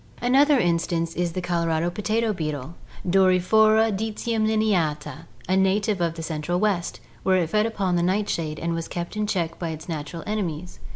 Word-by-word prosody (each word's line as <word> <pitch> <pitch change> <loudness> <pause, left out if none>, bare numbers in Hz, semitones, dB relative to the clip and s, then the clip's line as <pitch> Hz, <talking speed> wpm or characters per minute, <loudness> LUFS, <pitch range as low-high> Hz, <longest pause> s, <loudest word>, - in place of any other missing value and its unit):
Another 275 +4 +4
instance 170 -3 0
is 175 -1 -1
the 185 - -2
Colorado 170 -1 0
potato 215 +3 0
beetle 155 -4 -4 0.3
(Doryphora 205 +4 +4
dccendineata), 215 -8 -1 0.2
a 185 - +2
native 190 +1 +2
of 165 -1 0
the 165 - -6
Central 160 +2 -2
West, 200 -4 0 0.2
where 190 -1 +3
it 170 -3 -1
fed 215 +1 +2
upon 195 -5 -1
the - - +1
nightshade 175 -4 -1
and 170 +1 -2
was 165 0 -3
kept 175 +3 -5
in 210 0 -1
check 170 -5 -2
by 170 - -3
its 160 0 -7
natural 160 0 -5
enemies. 180 -5 -4
180 Hz, 165 wpm, -24 LUFS, 165-210 Hz, 0.3 s, Another